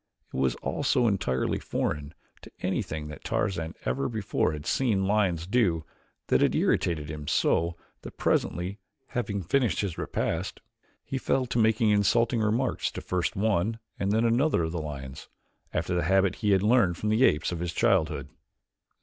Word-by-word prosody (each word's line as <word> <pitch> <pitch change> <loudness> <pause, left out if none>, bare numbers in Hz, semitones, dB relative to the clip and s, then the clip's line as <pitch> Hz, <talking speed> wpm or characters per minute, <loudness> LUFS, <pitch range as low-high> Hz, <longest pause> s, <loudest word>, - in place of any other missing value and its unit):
It - - -4
was 65 -2 +1
all - - -2
so 120 - +3
entirely 80 - 0
foreign 75 +1 -3 0.3
to - - -12
anything 75 -1 -2
that 75 - -10
Tarzan 85 -5 -1
ever 135 - 0
before 110 -8 0
had 75 -1 -6
seen 105 -3 +1
lions 95 -5 +1
do 90 -7 +1 0.4
that - - +2
it - - +3
irritated 80 -4 +1
him 75 -1 -7
so 85 +3 +1 0.2
that - - -10
presently, 90 +4 0 0.3
having 105 -6 -2
finished 120 +5 +1
his 95 -5 -3
repast, - - -2 0.4
he 135 - -3
fell 130 0 +1
to 120 -1 -1
making 110 0 +3
insulting 115 +3 +3
remarks 115 +4 0
to - - -5
first 90 -2 -1
one 105 +1 +1 0.2
and 100 +1 0
then 110 +2 +2
another 120 - +2
of 80 - -2
the 85 -1 -3
lions, 70 -1 -7 0.4
after 90 - -1
the 85 -2 0
habit 95 +1 +3
he 105 - 0
had 95 -1 +4
learned 105 -6 +3
from 105 - -2
the 110 +4 +3
apes 75 -8 +3
of 85 - -3
his 85 0 -2
childhood. 85 -2 +1
95 Hz, 170 wpm, -27 LUFS, 80-110 Hz, 0.4 s, had